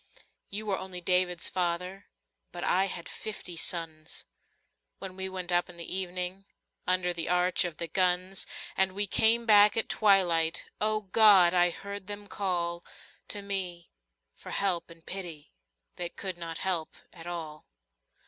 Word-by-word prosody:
You 210 +2 -5
were, 200 -3 0
only 185 -1 -5
David's 180 0 +2
father, 180 +2 -2 0.4
But - - -7
I 190 +2 +2
had 175 -3 -5
fifty 210 -5 -6
sons 160 -2 -4 0.7
When 190 -1 -7
we 190 0 -3
went 185 -1 -4
up 175 +1 +2
in 175 - -10
the 170 +2 -3
evening 185 +1 -2 0.4
Under 180 -1 +2
the 165 -1 -2
arch 180 +1 +3
of 170 -3 -4
the 170 - -3
guns, 185 +2 +1 0.3
And 190 0 +3
we 205 +2 +1
came 225 +4 +4
back 210 -1 +6
at 225 - +2
twilight 175 -5 +3
— - - -38
O 215 0 +2
God! 195 -3 +6
I 175 -1 +4
heard 200 +2 -8
them 205 0 -6
call 175 -4 -2 0.4
To 205 - -4
me 185 -4 -3 0.4
for - - -12
help 185 -4 0
and 165 0 -15
pity 170 - -7 0.4
That 175 -1 -5
could 190 -2 -3
not 165 -1 -6
help 175 -4 -2 0.2
at 170 -1 -11
all. 160 -3 -7
180 Hz, 160 wpm, -29 LUFS, 170-195 Hz, 0.7 s, back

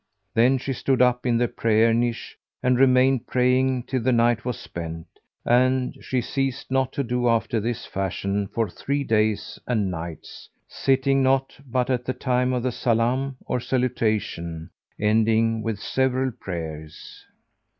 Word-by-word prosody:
Then 125 +4 +4
she 135 +1 -3
stood 130 0 0
up 125 0 +3
in 120 -1 +3
the 120 +1 +2
prayer 115 0 +2
niche 120 0 -1 0.3
and 125 0 +3
remained 130 -1 +4
praying 125 0 +2
till 130 0 -2
the 130 +3 +2
night 120 -1 +2
was 125 -2 -3
spent; 80 -1 -7 0.4
and 130 +1 +2
she 130 -1 -1
ceased 135 +1 -3
not 130 -1 +1
to 140 - -1
do 120 0 0
after 115 0 +1
this 115 +2 -3
fashion 100 +1 -2
for 115 +2 -1
three 140 +9 -2
days 110 -3 0
and 105 -6 0
nights, 85 -2 -8 0.2
sitting 135 0 +1
not 135 0 +1
but 125 +1 0
at 125 -1 0
the 130 - -1
time 125 -1 0
of 125 -2 -1
the 130 - +1
Salám 125 +4 0
or - - -1
salutation[FN#426] 110 -10 -1 0.3
ending 110 +1 +2
with 110 -2 -2
several 130 +3 0
prayers. 80 -8 -8
120 Hz, 150 wpm, -24 LUFS, 110-130 Hz, 0.4 s, Then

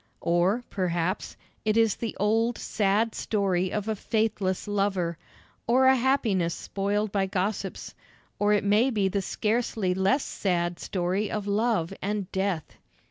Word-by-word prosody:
Or, 175 +8 +2
perhaps, 180 0 -1 0.3
it 215 0 +1
is 225 -3 +4
the 230 -3 -4
old, 225 +4 +2
sad 210 +2 +1
story 190 -4 0
of 210 0 -2
a 220 - 0
faithless 210 -3 -1
lover, 195 -5 0 0.5
or 255 +3 +4
a 265 0 +7
happiness 230 -10 +1
spoiled 205 +1 -2
by 195 -1 +1
gossips 195 0 -3 0.5
or 205 0 +3
it 210 0 +3
may 210 +6 +4
be 210 -6 +1
the 200 +1 -1
scarcely 215 -2 0
less 195 +10 +2
sad 175 -3 -1
story 185 +3 -1
of 210 -2 -3
love 205 -4 +1
and 200 -1 -2
death. 190 -4 -2
200 Hz, 140 wpm, -27 LUFS, 185-220 Hz, 0.5 s, a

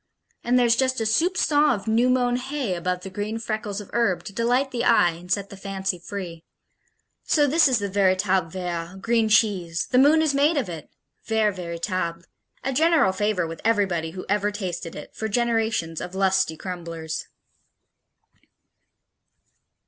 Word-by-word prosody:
And 245 +1 +2
there's 240 -2 +4
just 260 0 +1
a - - 0
soupçon 300 +2 +2
of 205 +1 -9
new 230 +3 +3
mown 245 -1 +2
hay 260 -4 -3
above 180 +1 -2
the 195 - -6
green 210 +3 -3
freckles 215 -3 -4
of 205 - -11
herb 230 -7 +1
to 200 - -9
delight 245 +5 +1
the 240 -2 -2
eye 225 -8 +4
and 175 +2 -11
set 200 +1 -1
the - - -8
fancy 195 -1 -3
free. 175 -3 -7 0.8
So 295 -2 +3
this 305 +3 +4
is 255 -3 +2
the 205 -2 -2
véritable 190 -3 +1
vert, 175 0 -5
green 230 -1 +2
cheese 190 -7 +2
the 250 - +4
moon 305 +4 +5
is 305 -3 +1
made 290 +3 +3
of 265 - 0
it! 165 -4 -8 0.4
Vert 220 -3 +1
véritable. 170 -1 -3 0.4
A 270 - -1
general 315 - +4
favorite 205 -3 0
with 165 0 -8
everybody 195 -7 +1
who 185 - -6
ever 205 +1 +1
tasted 185 -5 -5
it, 150 - -10
for 220 - -3
generations 220 -7 0
of 180 +1 -7
lusty 190 -4 +1
crumblers. 165 -3 -6
205 Hz, 165 wpm, -24 LUFS, 180-240 Hz, 0.8 s, moon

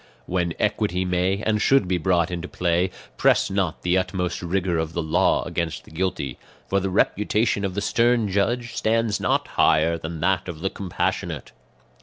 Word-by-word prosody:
"When 85 -2 -1
equity 105 -3 0
may 90 +3 0
and 105 -1 +1
should 135 -7 +4
be 90 -1 0
brought 85 0 +1
into 90 0 -4
play, 90 +1 0 0.3
press - - +3
not 95 -4 -1
the 90 +1 +3
utmost 90 -1 -2
rigour 90 -1 0
of 80 0 -3
the 85 - -2
law 80 - +2
against 85 -2 -3
the - - -17
guilty; 90 -4 -3 0.3
for 100 - +1
the 95 0 -2
reputation 105 +2 +1
of 95 -2 -2
the 100 - -1
stern 115 +1 +2
judge 115 +5 0
stands 110 -1 +1
not - - +1
higher 80 +2 +3
than 80 0 -6
that 90 0 +1
of 80 -3 -7
the 95 +1 -1
compassionate. 95 -3 -3
95 Hz, 175 wpm, -23 LUFS, 85-100 Hz, 0.3 s, should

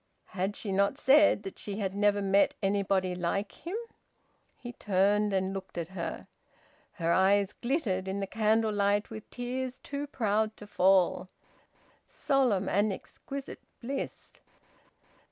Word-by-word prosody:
Had 195 +2 -1
she 205 - -4
not 200 +6 +2
said 290 -5 +5
that 195 - -7
she 205 -1 -4
had 195 -3 -2
never 205 0 +2
met 195 +1 +3
anybody 195 -2 +1
like 180 +3 -2
him? 355 +6 -6 0.8
He 240 0 -9
turned 205 0 +2
and 190 0 0
looked 190 -2 -7
at 170 -1 -3
her. 185 -3 -5 0.7
Her 170 -2 0
eyes 195 +1 +3
glittered 235 - -1
in 190 +1 -2
the 195 - -1
candle 220 +1 +1
light 205 +1 +1
with 220 -1 -9
tears 255 +1 -4
too 285 +1 -5
proud 220 -4 0
to 210 - -10
fall. 185 -2 +3 0.8
Solemn 245 -9 +1
and 205 +2 +2
exquisite 275 +7 -8 0.2
bliss! 270 +3 -5
205 Hz, 135 wpm, -30 LUFS, 190-225 Hz, 0.8 s, said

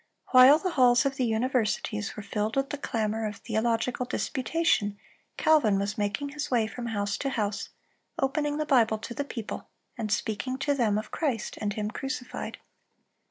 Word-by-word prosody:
While 260 +3 +9
the 365 +3 -2
halls 250 -3 +5
of 270 -1 0
the 255 - +1
universities 220 -3 0
were 210 - -5
filled 210 +2 -2
with 270 0 0
the 290 - -3
clamor 220 -4 -1
of 210 - -5
theological 230 +3 -1
disputation, 255 -7 0 0.4
Calvin 275 -11 +4
was 200 +1 -1
making 210 +8 -1
his 295 +1 -4
way 235 -4 +2
from 235 +2 -6
house 205 -3 -1
to 275 - -1
house, 210 -5 -2 0.5
opening 295 +2 0
the 305 - -1
Bible 230 -6 +4
to 220 +2 -7
the 285 - -2
people, 235 -6 -6 0.3
and 215 -2 -2
speaking 220 +5 -1
to 285 +2 +1
them 225 -7 +2
of 215 - -5
Christ 265 - -2
and 205 -1 -1
Him 210 +1 -3
crucified. 260 0 -5
235 Hz, 170 wpm, -28 LUFS, 215-270 Hz, 0.5 s, While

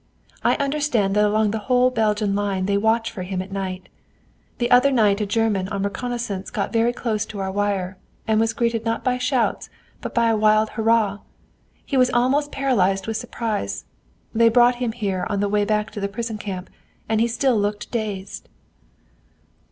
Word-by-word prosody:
I - - +3
understand 275 -8 0
that 210 - +4
along 210 0 +2
the 220 - -2
whole 250 0 +4
Belgian 210 -3 +1
line 200 -2 -1
they 200 +1 +1
watch 220 +2 +1
for 190 - -7
him 185 0 -3
at 190 +1 -6
night. 190 -2 -4 0.7
The 240 - -1
other 250 +3 +6
night 215 -6 +3
a 210 - -1
German 205 -3 +1
on 195 0 -3
reconnoissance 210 -2 -3
got 200 - -3
very 230 +1 +3
close 225 -4 -2
to 210 - -8
our 190 0 -2
wire, 195 -2 -1 0.3
and 220 -1 +3
was 225 0 +2
greeted 230 -1 0
not 230 0 -2
by 250 -1 0
shots 250 -1 0 0.3
but - - -6
by 235 -1 +3
a - - +2
wild 215 0 +3
hurrah. 220 -3 +1 0.7
He 275 - -1
was 255 -1 +5
almost 260 +5 +1
paralyzed 195 -8 +1
with 225 -1 -2
surprise. 215 - -3 0.5
They 230 +1 +5
brought 240 +1 +4
him 235 -3 -1
here 200 -6 -2
on 205 - -1
the 205 - +1
way 205 0 +1
back 210 0 0
to 210 - -6
the 200 0 -2
prison 220 +1 -4
camp, 190 -3 -6 0.4
and 220 0 +1
he 230 - +3
still 240 +2 +1
looked 205 0 -2
dazed." 205 -4 -4
215 Hz, 185 wpm, -22 LUFS, 200-235 Hz, 0.7 s, other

